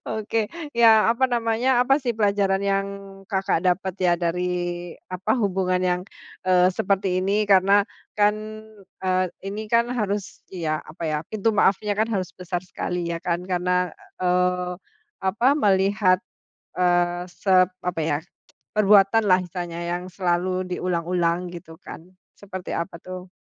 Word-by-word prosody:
Oke. 220 0 -1 0.3
Ya, 225 -1 +6
apa 235 +3 +2
namanya, 240 +1 +2
apa, 270 +3 +3
sih, 245 -5 -2
pelajaran 200 -2 +1
yang 195 0 +1 0.4
Kakak 190 -3 0
dapat, 185 +1 +1
ya, 180 -2 +3
dari 175 +1 -1 0.7
apa 185 +1 -4
hubungan 185 -2 0
yang, 180 -1 +1 0.5
eee, 185 0 +5
seperti 190 0 0
ini 200 +3 +1
karena, 195 +1 +6 0.3
kan, 210 0 +3 0.7
eee, 185 0 +1 0.2
ini, 205 +3 -5
kan, 235 +2 +2
harus, 205 -5 -3
ya, 160 -4 -2
apa, 160 +2 -11
ya, 155 - 0
pintu 220 +1 0
maafnya, 205 0 +2
kan, 220 - +3
harus 185 -2 -2
besar 180 0 -5
sekali, 175 -1 -4
ya, 170 - -2
kan, 175 0 -2
karena, 180 -1 0 0.3
eee, 180 0 +1 0.5
apa 195 +5 0
melihat, 195 -3 +3 0.6
eee, 175 0 +2
sep 185 0 +3
apa, 180 -2 -2
ya, 145 - +1 0.6
perbuatanlah 200 -1 +5
misalnya 175 -1 -5
yang 175 +1 -3
selalu 185 0 0
diulang-ulang 175 0 -1
gitu, 170 -1 -10
kan, - - -9 0.4
seperti 185 -2 -7
apa, 170 0 -4
tuh? 185 0 -8
185 Hz, 135 wpm, -24 LUFS, 180-205 Hz, 0.7 s, Ya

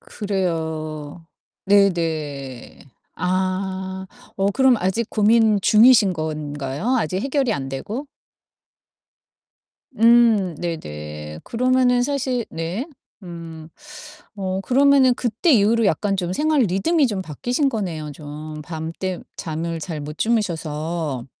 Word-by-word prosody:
그래요. 160 -5 -4 0.4
네네. 160 - 0 0.4
아 185 +1 -1 0.5
어 195 0 +1
그럼 265 -1 +4
아직 200 +5 -1
고민 215 -1 +4
중이신 215 -2 +6
건가요? 155 - -2
아직 185 0 -1
해결이 270 -3 0
안 135 -5 -3
되고? 215 - -5 1.9
음 225 -6 +5
네네 75 - -6
그러면은 250 0 +2
사실 260 -3 -1
네 170 - -4 0.4
음 165 -3 -9 0.7
어 190 -1 -2
그러면은 270 0 +4
그때 245 - +1
이후로 225 +1 +4
약간 195 +2 +1
좀 180 -1 -2
생활 300 +3 +2
리듬이 245 - +2
좀 205 -5 -2
바뀌신 245 - -1
거네요 170 - -3
좀. 150 +1 -8
밤 160 0 -5
때 185 -2 -2 0.2
잠을 165 +1 -4
잘 160 -1 -5
못 150 +1 -7
주무셔서. 160 - -2
185 Hz, 205 characters per minute, -22 LUFS, 155-230 Hz, 1.9 s, 중이신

